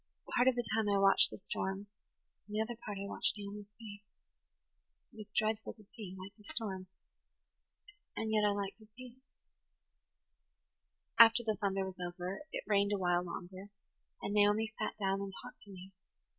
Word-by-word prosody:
Part 245 +1 +4
of 260 - +5
the 240 -1 -1
time 220 -2 +2
I 200 - +3
watched 195 0 +6
the - - -8
storm, 195 0 -3 0.6
and 210 - -7
the - - +1
other 235 +2 -3
part 210 -3 -7
I 200 - -4
watched - - +3
Naomi's 205 0 -7
face. 205 -3 -9 1.1
It - - -16
was 210 -1 -9
dreadful 215 0 0
to 215 - -18
see, 205 -2 -9
like 190 +2 -9
the 210 - -20
storm, 195 -4 -4 1.3
and 220 -1 -1
yet 215 -1 +3
I 210 - +5
liked 200 -1 -2
to 215 -1 -14
see 245 +3 -12
it. - - -30 2.0
"After 230 +1 +4
the 215 -1 +1
thunder 195 -1 -1
was 190 -1 -8
over 180 +2 -4
it - - -4
rained 200 0 +2
a - - +1
while 175 -2 +2
longer, 185 +3 -7 0.5
and 205 - -2
Naomi 210 +2 +3
sat - - -2
down 195 -1 0
and 200 0 -4
talked 245 - -11
to - - -16
me. 190 0 -10
205 Hz, 180 wpm, -34 LUFS, 195-220 Hz, 2.0 s, watched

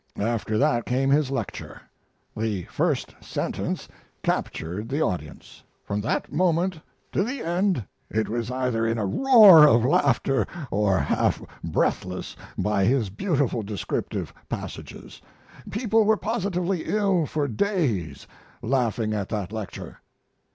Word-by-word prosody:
After 110 0 -1
that 120 +2 +2
came 135 +2 +1
his 145 -1 +3
lecture. 135 - -5 0.6
The 110 -4 -2
first - - 0
sentence - - -3 0.4
captured 90 +8 -2
the 140 +3 -1
audience. 85 - -4 0.2
From 100 +1 -2
that 110 - -2
moment 175 +1 +1 0.3
to - - +1
the 250 +4 -4
end 175 - 0 0.2
it 110 0 0
was 115 +1 -3
either 125 -3 -1
in 115 +1 0
a 105 - -1
roar 205 - +8
of 120 -4 +4
laughter 135 0 +2 0.2
or 100 -2 +2
half 70 - +1 0.2
breathless 90 0 -1 0.2
by 105 -2 +1
his 120 -4 +1
beautiful 145 - 0
descriptive 100 -3 -4 0.2
passages. - - -7 0.5
People 220 0 +2
were 220 0 +4
positively 195 -5 -1
ill 195 -7 +1
for 145 0 -1
days, 125 - -1 0.4
laughing 115 -3 0
at 100 -3 -3
that 105 -4 -3
lecture." 110 -3 -7
125 Hz, 125 wpm, -25 LUFS, 105-175 Hz, 0.6 s, roar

